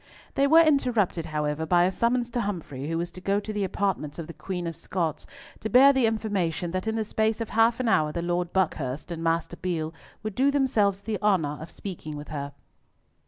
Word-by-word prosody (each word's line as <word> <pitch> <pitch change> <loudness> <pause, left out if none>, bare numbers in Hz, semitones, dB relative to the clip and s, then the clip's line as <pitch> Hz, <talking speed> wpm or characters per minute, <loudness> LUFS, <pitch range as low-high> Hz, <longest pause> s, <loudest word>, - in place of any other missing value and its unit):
They 275 +1 +3
were 325 +3 +7
interrupted, 240 - +2
however, 150 0 -1
by 175 +2 +4
a 185 - +2
summons 240 +4 0
to 240 - 0
Humfrey, 160 - -4
who 165 - -1
was 170 +1 -3
to 185 - -11
go 200 +2 +1
to 215 +1 -6
the 205 -1 -1
apartments 190 -6 -2
of 165 - -5
the 170 - -9
Queen 180 -1 -5
of 165 -1 -4
Scots, 165 -2 -3 0.3
to 220 - -4
bear 270 +4 +7
the 260 -4 +3
information 195 -7 -1
that 185 +4 -3
in 220 - 0
the 220 -1 -1
space 220 +1 0
of 230 - -3
half 225 +2 +3
an 255 - 0
hour 155 -8 +3
the 170 +2 -3
Lord 175 0 -1
Buckhurst 155 -5 -1
and 165 -1 -4
Master 165 +1 0
Beale 165 -3 -2 0.3
would 215 -1 -3
do 265 +7 +3
themselves 225 -9 +2
the 210 -2 -3
honour 165 -9 +1
of 160 - -8
speaking 160 -6 -7
with 145 - -8
her. 140 -2 -4
185 Hz, 215 wpm, -26 LUFS, 165-220 Hz, 0.3 s, were